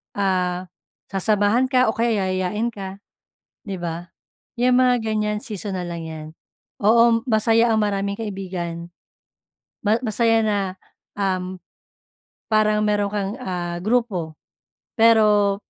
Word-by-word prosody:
Ah, 185 -2 -1 0.4
sasamahan 205 +5 +2
ka 255 -3 +4
o - - +3
kaya 230 0 +1 0.2
yayayain 195 +5 -1
ka, 195 -1 -8 0.6
'di 195 -3 -6
ba? 170 0 -5 0.5
Yung 250 +1 +4
mga 250 -2 +3
ganyan 210 -1 -1
seasonal 190 -4 -5
lang 170 -1 -5
yan 155 -1 -7 0.5
oo 230 +2 +4
masaya 225 0 +3
ang 220 - +2
maraming 200 0 -1
kaibigan, 180 -5 -5 0.9
ma 210 - +4
masaya 225 0 +2
na, 210 -2 +1 0.6
um, 185 -2 -2 0.8
parang 215 -1 +2
mayron' 205 -1 +1
kang, 200 0 -2
ah, 175 -5 -4
grupo 195 -8 -1 0.6
pero 210 -3 +4
205 Hz, 115 wpm, -22 LUFS, 185-225 Hz, 0.9 s, ka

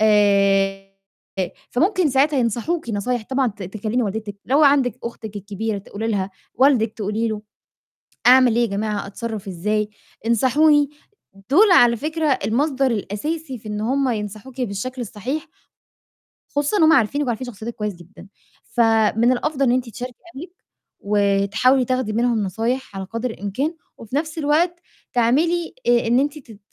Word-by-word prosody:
آآ 200 -2 +3 0.8
فممكن 360 - +2
ساعتها 275 +2 +3
ينصحوكِ 240 +5 -1
نصايح 225 +3 -1
طبعًا 265 0 +2
ت 200 -2 -9
تكلّمي 215 +6 -2
والدتِك، 210 -1 -4
لو 280 +4 +3
عندِك 275 -4 +3
أختِك 220 -3 -7
الكبيرة 205 +1 -4
تقولي 205 +3 -5
لها، 200 -3 -1 0.2
والدِك 245 -4 +3
تقولي 220 +2 -2
له: 210 -1 -4 0.9
"أعمل 250 -2 +6
إيه 240 - +3
يا 235 - +2
جماعة، 205 0 -2
أتصرّف 215 0 -6
إزاي؟ 210 +4 -1 0.4
انصحوني." 285 +5 +4 0.6
دُول 385 +6 +6
على 240 -8 +6
فكرة 310 +4 -2 0.2
المصدر 270 +3 +1
الأساسي 260 +7 -3
في 215 -1 -10
إن 210 0 -3
هم 265 +3 +1
ينصحوكِ 215 +4 -5
بالشكل 245 +3 -4
الصحيح. 245 +7 -4 1.1
خصوصًا 290 +8 +1
إن 330 - +4
هم 315 +1 +6
عارفينِك 285 +3 +2
وعارفين 240 +2 -2
شخصيّتِك 235 0 -7
كويس 210 -2 -3
جدًا، 175 +3 -15 0.4
فمن 225 0 +3
الأفضل 275 +2 0
إن 240 - +3
أنتِ 250 -1 0
تشاركي 245 +2 -7 0.2
أهلِك، 330 +7 -8 0.5
وتحاولي 205 +5 +2
تاخدي 255 -3 -1
منهم 235 -1 +1
نصايح 225 +5 -2
على 190 0 -4
قدر 230 +5 -3
الإمكان 255 - -3 0.2
وفي 230 +4 -8
نَفْس 310 +2 -2
الوقت 320 +4 +1 0.3
تعملي 310 +8 +1
آآ 240 -1 +3
إن 240 +2 +4
أنتِ 290 +2 -1
تت 225 -7 -15
235 Hz, 145 wpm, -21 LUFS, 210-270 Hz, 1.1 s, أعمل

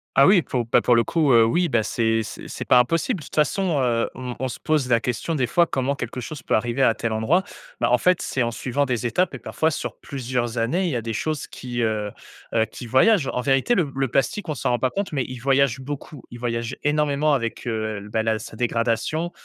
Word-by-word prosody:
Ah 135 - +7
oui, 190 0 +6
pour 125 -4 -2
bah, 115 - +3
pour 120 - +4
le 115 - +4
coup, 155 -5 +1
heu, 115 -1 +7
oui, 170 +9 +1
ben, 120 -5 +2
c'est 115 0 0
c'est - - -8
c'est - - -6
pas 125 - +6
impossible. 165 - +1
De - - -10
toute - - -11
façon, 155 +2 +1
heu, 120 -3 +1
on 125 -1 -6
on 130 - -1
se 120 - -7
pose 150 -5 0
la 115 -1 +4
question 125 +7 -2
des 130 -3 +1
fois 170 +5 +3
comment 135 +1 -1
quelque 130 - -5
chose 125 +2 -7
peut - - 0
arriver 120 +4 0
à 115 -4 +4
tel 115 - -2
endroit. 110 +13 +2 0.4
Bah, - - +1
en 125 - +5
fait, 180 -1 +3
c'est 130 - -2
en 120 - +1
suivant 135 +4 -1
des 125 -2 -2
étapes 180 +10 +1
et - - -7
parfois 160 - 0
sur 155 - -4
plusieurs 125 -3 -3
années, 160 +12 +1
il - - 0
y 135 - -2
a 120 - -1
des 115 -1 -3
choses 155 +6 -2
qui, 120 -1 -5
heu 110 -2 -1 0.4
heu, 110 -1 +3
qui 120 +1 -10
voyagent. 135 - +4
En 125 - -1
vérité, 135 - +2
le 155 -9 0
le 135 0 0
plastique, 160 - -1
on 150 - -1
s'en 125 - -1
rend 120 - +1
pas 130 - +1
compte, 200 +6 -3
mais 135 -4 0
il 130 -1 -7
voyage 135 0 +2
beaucoup. 140 0 -7
Il 120 - -9
voyage 115 -1 -2
énormément 150 0 +2
avec, 115 -1 -4
heu, 110 -2 -2
bah, 110 0 0
la 110 -1 0
sa 110 +1 -9
dégradation, 120 +8 -1
130 Hz, 250 wpm, -23 LUFS, 115-150 Hz, 0.4 s, Ah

